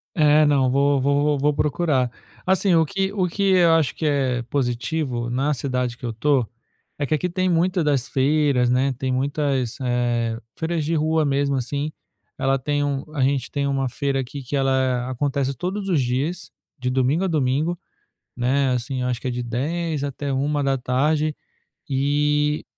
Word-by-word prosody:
É, 150 -2 +5
não, 140 -3 +3
vou 140 +1 +3
vou 145 +2 +2
vou 150 +2 +2
procurar. 145 -4 +1 0.3
Assim, 190 0 +3
o 160 -1 +4
que 195 +3 -2
o 185 -3 +1
que 200 +4 -2
eu 175 -3 +5
acho 160 -4 +1
que 160 - -3
é 135 -4 +1
positivo 125 0 -2
na 135 +5 0
cidade 125 -3 -2
que 125 - -8
eu 120 - -2
tô, 130 +2 +1 0.5
é 145 - -1
que 150 - -1
aqui 165 +4 0
tem 185 +1 0
muito 180 +2 +2
das 140 -4 0
feiras, 140 -2 +2
né. 130 +2 +2
Tem 130 -1 -2
muitas, 135 -2 -1
eh, 120 -2 0 0.2
feiras 160 -1 -1
de 165 +3 0
rua 155 0 +2
mesmo, 140 0 +1
assim. 140 +4 -2 0.4
Ela 135 0 +1
tem 145 +2 -1
um 140 -1 -1
a 140 - 0
gente 135 -1 +1
tem 140 -1 -2
uma 135 -1 0
feira 135 +2 -1
aqui 135 +2 -5
que 130 +3 -4
ela 130 -2 +1
acontece 135 +1 -1
todos 195 - -3
os 165 -7 +2
dias, 135 +9 -2 0.3
de 125 -2 -2
domingo 130 +7 +1
a - - +1
domingo, 155 +2 0 0.6
né. 135 +3 +1
Assim, 125 +1 -2
acho 125 -1 -1
que - - -7
é - - 0
de 125 0 -3
10:00 145 +6 -2
até 140 0 -3
13:00. 145 +2 0 0.5
E 150 +2 +1
140 Hz, 175 wpm, -22 LUFS, 130-150 Hz, 0.6 s, É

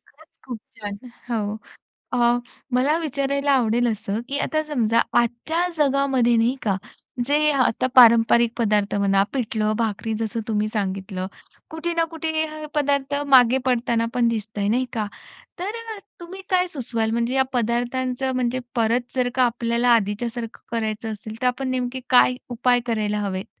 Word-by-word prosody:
खरंच, 315 +3 -22 0.2
खूप 245 -3 -5 0.2
छान. 205 -1 -6 0.3
हो, 215 -1 -2 0.6
अ, 240 -1 +3 0.4
मला 280 +6 +3
विचारायला 280 -2 -1
आवडेल 240 -2 +2
असं, 215 0 -3
की 280 - -1
आता 310 -1 0
समजा 235 -7 +1 0.2
आजच्या 240 +9 -1
जगामध्ये 270 -4 +2
नाही 235 +4 +2
का, 200 -3 0 0.5
जे 300 +3 +3
आता 255 -2 +1
पारंपरिक 235 -1 +6
पदार्थ 210 -3 +1
म्हणा 195 -1 +3
पिठलं-भाकरी 220 -2 -1
जसं 225 0 -2
तुम्ही 215 -1 0
सांगितलं. 190 -2 -3 0.4
कुठे 320 +2 -3
ना 335 0 +2
कुठे 325 0 -4
हे 315 0 0 0.2
अ, - - -4
पदार्थ 285 -1 0 0.2
मागे 250 +1 +6
पडताना 235 -2 +1
पण 245 -2 +2
दिसतय, 215 -2 -2
नाही 250 +4 +1
का. 215 -3 -2 0.5
तर 400 +5 -3 0.2
अ, - - -10 0.2
तुम्ही 370 +3 -9
काय 365 -1 +3
सुचवाल 230 -7 -2
म्हणजे 235 +2 0
या 265 - +4
पदार्थांचं 245 +2 -1
म्हणजे 250 0 0 0.2
परत 235 +1 0
जर 250 -1 +1
का 255 - +4
आपल्याला 235 0 +1
आधीच्यासारखं 230 +2 -3
करायचं 220 -1 -2
असेल, 215 +1 -8
तर 250 - +2
आपण 260 +2 -1
नेमके 255 0 -2
काय 250 0 +5
उपाय 245 +1 +2
करायला 210 -2 -1
हवेत? 195 -2 -3
240 Hz, 155 wpm, -23 LUFS, 220-265 Hz, 0.6 s, पारंपरिक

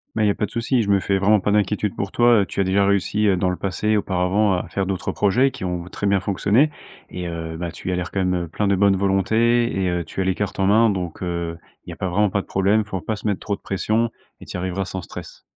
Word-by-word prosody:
Bah, 110 - +1
il - - +4
y - - +4
a 100 - +3
pas 105 - -1
de - - -11
souci, 115 +1 +1
je 100 - -2
me 100 -1 +3
fais 100 +1 +1
vraiment 100 +1 +3
pas 100 - 0
d'inquiétude 105 0 +1
pour 100 -1 -4
toi, 120 -2 +5
heu. 100 - 0
Tu 100 - -2
as - - +3
déjà 100 +1 +2
réussi, 100 +2 +1
heu, 95 - +4
dans 90 +1 0
le 90 - -2
passé 105 +3 0
auparavant, 95 +2 +1
à 90 - -1
faire 95 -1 -1
d'autres 95 -1 -2
projets 125 +7 +2
qui 130 -7 -6
ont 90 -1 -3
très 100 - -3
bien 100 -1 +2
fonctionné 105 +9 +2 0.4
et 90 -1 -5
heu, 80 -1 -5
bah, 85 0 -3
tu 90 - -5
as 90 - 0
l'air, 90 -1 -4
quand 95 -1 0
même, 90 -1 0
heu, - - -11
plein 100 +6 -2
de 100 - +3
bonne 100 0 +4
volonté 110 +5 +2
et 95 -1 +1
heu, 90 -1 -1
tu 90 +5 -4
as - - +2
les 95 0 +1
cartes 105 +2 -4
en 95 - +2
main, 110 +3 +5
donc, 90 -5 -4
heu. 85 -2 -3 0.3
Il - - -10
y - - -5
a - - -13
pas 95 - -2
vraiment 105 +3 +2
pas 100 - 0
de - - -16
problème, 100 +3 +2
il - - -23
faut 95 -3 -3
pas 110 +6 -3
se 105 - -5
mettre 100 -3 -1
trop 105 - -2
de - - -38
pression 110 +4 0 0.3
et - - -12
tu - - -9
y - - -1
arriveras 95 +1 -2
sans 95 0 -5
stress. - - -10
100 Hz, 305 wpm, -22 LUFS, 90-105 Hz, 0.4 s, toi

